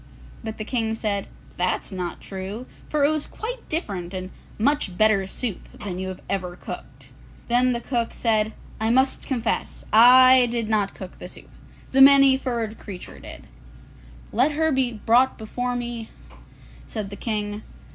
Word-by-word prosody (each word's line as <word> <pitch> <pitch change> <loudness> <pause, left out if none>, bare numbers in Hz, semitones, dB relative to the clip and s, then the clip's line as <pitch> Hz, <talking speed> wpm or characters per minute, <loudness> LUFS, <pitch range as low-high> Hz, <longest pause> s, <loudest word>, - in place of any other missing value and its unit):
But 220 -1 -5
the 215 - -4
King 225 -2 -1
said, 205 -3 -2 0.3
'That's 180 +3 -1
not 180 -2 -5
true, 195 +5 -6 0.2
for 295 -2 +2
it 295 - +3
was 310 -1 -1
quite 480 +2 -7
different 195 - -3
and 185 0 -5 0.3
much 235 -6 0
better 215 -3 +3
soup 215 -1 -3
than 190 -4 -6
you 190 - -3
have 185 -1 -7
ever 180 -2 -3
cooked.' - - -10 0.4
Then 250 +1 +3
the 235 - -3
cook 235 -3 -1
said, 220 -2 +1 0.3
'I 220 +1 0
must 260 +3 +2
confess; 240 -4 -2
I 255 +2 +8
did 230 -2 -2
not 210 -2 +1
cook 185 -2 -10
the - - -7
soup; - - -12 0.4
the 270 - +4
Many 275 -1 +8
furred 235 -4 -3
Creature 190 -4 -9
did.' - - -10 0.9
'Let 260 +7 +2
her 320 +1 +1
be 260 -3 +1
brought 235 +4 +3
before 245 +3 -3
me,' 240 -2 -5 0.8
said 205 -2 -5
the - - -6
King. 210 -1 -3
225 Hz, 160 wpm, -24 LUFS, 200-255 Hz, 0.9 s, I